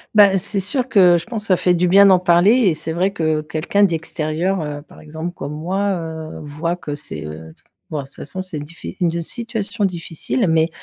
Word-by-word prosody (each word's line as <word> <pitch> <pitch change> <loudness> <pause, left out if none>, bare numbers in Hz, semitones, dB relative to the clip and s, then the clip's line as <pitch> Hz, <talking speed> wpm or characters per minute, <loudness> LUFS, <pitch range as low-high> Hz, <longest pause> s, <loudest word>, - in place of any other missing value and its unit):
Bah 200 -2 +7
c'est 200 +1 -2
sûr 250 +7 0
que 180 -7 +5
je 170 - -5
pense 225 -2 -5
ça 185 - +4
fait 180 - +2
du 175 0 +1
bien 200 +2 +7
d'en 190 -2 +6
parler 175 +2 +4
et 235 -9 +3
c'est 160 +1 -4
vrai 185 +4 +1
que, 155 -5 0
quelqu'un 155 +6 0
d'extérieur, 165 +1 -1
heu, 145 -1 -5
par 145 - -17
exemple, 160 +3 -6
comme 140 -4 -6
moi, 190 +6 -1
heu, 160 -1 -7
voit 155 +4 -3
que 150 -4 -5
c'est, 75 - -6
heu, 80 +1 -9 0.4
bon 155 - -2
de 140 - -5
toute 135 - -17
façon 185 +6 -6
c'est 185 -5 -5
diffi 170 +5 -9
une 175 -2 +2
d 170 +1 -2
situation 225 +2 -3
difficile 180 - -1
mais, 160 0 +2
170 Hz, 215 wpm, -19 LUFS, 155-195 Hz, 0.4 s, Bah